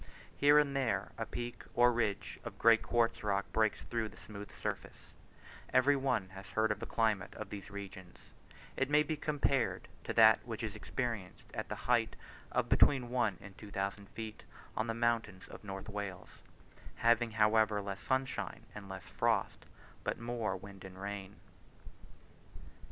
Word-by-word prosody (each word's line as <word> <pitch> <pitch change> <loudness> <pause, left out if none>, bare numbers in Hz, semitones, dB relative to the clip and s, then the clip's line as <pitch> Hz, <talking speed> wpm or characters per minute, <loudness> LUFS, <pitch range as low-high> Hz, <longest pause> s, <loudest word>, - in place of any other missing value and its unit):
Here 145 +1 +6
and 145 -2 +3
there 130 -4 0
a - - -2
peak 120 0 -5
or 120 0 +6
ridge 110 -4 -1
of - - -7
grey 115 -1 +7
quartz 115 0 +1
rock 100 -1 +1
breaks 110 -1 +2
through 115 -2 -2
the - - -16
smooth 105 -1 -9
surface - - -6 0.6
Every 130 +3 +5
one 125 -8 0
has 95 0 -10
heard 110 0 +1
of 105 - -1
the 115 - -5
climate 110 -5 +1
of 110 -2 -7
these 100 -1 -7
regions; 95 -3 -8 0.6
it 135 - 0
may 150 +1 +5
be 155 +1 -2
compared 140 -4 0 0.2
to - - -2
that - - +7
which - - -5
is - - -3
experienced 115 -8 -4
at - - -4
the - - -2
height - - +3 0.4
of - - +1
between 130 -4 +5
one 115 -7 +1
and 100 -1 -11
two 105 - -9
thousand 100 +1 -3
feet, 110 -2 -7 0.3
on 110 - 0
the 115 - -1
mountains 115 -5 0
of - - -10
North 95 -1 -6
Wales; 100 -3 -6 0.5
having 115 0 +3
however 110 -1 +4
less 100 0 -5
sunshine 130 0 -1
and 100 -2 -9
less 95 -1 -7
frost - - 0 0.4
but - - -1
more 115 -5 -2
wind 100 0 -11
and 95 -1 -10
rain. 100 0 -5
110 Hz, 165 wpm, -34 LUFS, 100-120 Hz, 0.6 s, grey